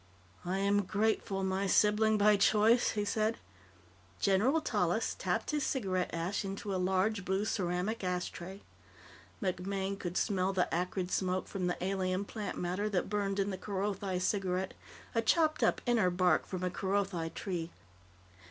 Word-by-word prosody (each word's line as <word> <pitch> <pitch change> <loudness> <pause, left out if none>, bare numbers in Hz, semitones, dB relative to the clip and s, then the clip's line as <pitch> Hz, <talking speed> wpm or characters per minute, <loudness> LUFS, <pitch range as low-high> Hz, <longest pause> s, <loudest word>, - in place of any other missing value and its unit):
"I 185 +2 -1
am 200 +1 +2
grateful, 200 -1 0
my 190 +1 0
sibling 215 +2 +4
by 210 0 +5
choice," 215 +4 +4
he 210 -1 -1
said. 215 +2 0 0.8
General 215 +11 +3
Tallis 315 - 0
tapped - - -1
his 300 -2 0
cigarette 190 -10 -1
ash 170 +5 -2
into 195 +1 -4
a 185 - 0
large 190 +3 +1
blue 190 +3 0
ceramic 190 +2 -1
ashtray. 180 +1 -4 0.8
MacMaine 195 +1 -2
could 175 0 -3
smell 195 -2 +1
the 180 -2 0
acrid 180 +1 -1
smoke 185 0 0
from 185 -3 -2
the 175 - -1
alien 190 0 -1
plant 210 0 -5
matter 185 +4 -1
that 195 -1 -1
burned 200 -1 0
in 200 0 0
the 190 - -5
Kerothi 195 -1 -2
cigarette 185 -1 -1 0.4
a 230 - +2
chopped 310 +6 +2
up - - +2
inner 230 -7 +3
bark 180 -2 +2
from 185 -1 -4
a 180 - 0
Kerothi 190 -3 -1
tree. 175 -4 -3
195 Hz, 150 wpm, -32 LUFS, 185-210 Hz, 0.8 s, by